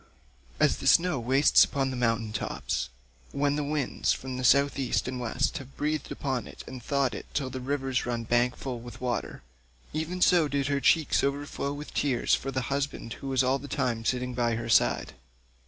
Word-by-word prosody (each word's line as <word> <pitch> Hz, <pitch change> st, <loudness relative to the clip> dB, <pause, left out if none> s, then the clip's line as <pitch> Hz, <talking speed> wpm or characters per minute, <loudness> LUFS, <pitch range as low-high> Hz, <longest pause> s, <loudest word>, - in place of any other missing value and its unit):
As -, -, +3 dB
the -, -, -4 dB
snow 175 Hz, -5 st, +4 dB
wastes 130 Hz, +5 st, +5 dB
upon 135 Hz, -1 st, -1 dB
the -, -, -4 dB
mountain 115 Hz, -3 st, 0 dB
tops -, -, -2 dB, 0.4 s
when 145 Hz, 0 st, +1 dB
the 150 Hz, -, -1 dB
winds 145 Hz, -1 st, 0 dB
from 130 Hz, -1 st, -3 dB
South 140 Hz, +2 st, +4 dB
East 130 Hz, -2 st, 0 dB
and 130 Hz, 0 st, -3 dB
West 125 Hz, +3 st, -1 dB
have 135 Hz, 0 st, -13 dB
breathed 150 Hz, 0 st, -2 dB
upon 130 Hz, -4 st, -2 dB
it -, -, -10 dB
and 130 Hz, -1 st, -8 dB
thawed 135 Hz, -1 st, 0 dB
it -, -, -7 dB
till 135 Hz, -3 st, -1 dB
the 130 Hz, -, -4 dB
rivers 135 Hz, -1 st, -1 dB
run 120 Hz, -1 st, -2 dB
bank 120 Hz, +2 st, +2 dB
full 125 Hz, -3 st, -5 dB
with 120 Hz, +1 st, -10 dB
water, 120 Hz, -, -3 dB, 0.5 s
even 160 Hz, +4 st, -3 dB
so 175 Hz, -3 st, +5 dB
did 140 Hz, -1 st, -1 dB
her 140 Hz, -1 st, 0 dB
cheeks 160 Hz, +1 st, +3 dB
overflow 140 Hz, 0 st, -2 dB
with 145 Hz, +1 st, -7 dB
tears 130 Hz, -5 st, +1 dB
for 135 Hz, -, +1 dB
the 130 Hz, -1 st, -1 dB
husband 140 Hz, -4 st, -3 dB
who 140 Hz, -, -6 dB
was 135 Hz, -1 st, +2 dB
all 130 Hz, +2 st, +2 dB
the 145 Hz, -, -9 dB
time 120 Hz, -4 st, -1 dB
sitting 125 Hz, +1 st, -1 dB
by 120 Hz, -1 st, +1 dB
her 115 Hz, +1 st, -4 dB
side. -, -, +3 dB
135 Hz, 195 wpm, -28 LUFS, 125-140 Hz, 0.5 s, wastes